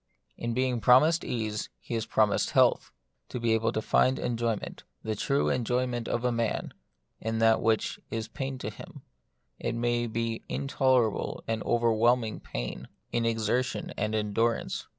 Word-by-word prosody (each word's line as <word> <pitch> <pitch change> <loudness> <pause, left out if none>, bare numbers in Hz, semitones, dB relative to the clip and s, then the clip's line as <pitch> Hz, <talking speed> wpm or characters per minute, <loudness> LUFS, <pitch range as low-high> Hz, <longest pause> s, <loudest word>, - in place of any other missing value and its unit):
In 120 -1 -3
being 125 -2 0
promised 155 +9 +5
ease, 110 -3 -3
he - - -8
is 115 -1 -1
promised 105 -2 +2
health; - - +4
that - - -22 0.4
is, - - -19
to 125 - -2
be 115 -1 +2
able 110 0 +1
to 110 - -2
find 130 +1 +3
enjoyment, 115 -2 -2 0.2
the 110 - -1
true 140 +7 +1
enjoyment 125 -1 0
of 120 +1 -1
a 125 - +3
man, 115 -2 -1 0.5
in 110 +1 -2
that 115 0 +4
which 110 -1 +1
is 110 -1 -3
pain 135 +3 -4
to - - -5
him, - - -12 0.6
it 115 - -2
may 120 0 0
be 115 0 -2
intolerable 130 -5 +1
and 110 -1 -1
over 120 -1 +3
whelming 115 0 +2
pain; - - -5 0.2
in 115 -1 +1
exertion 115 +3 -1
and 105 +1 -1
endurance. 110 +2 0
115 Hz, 165 wpm, -28 LUFS, 110-125 Hz, 0.6 s, promised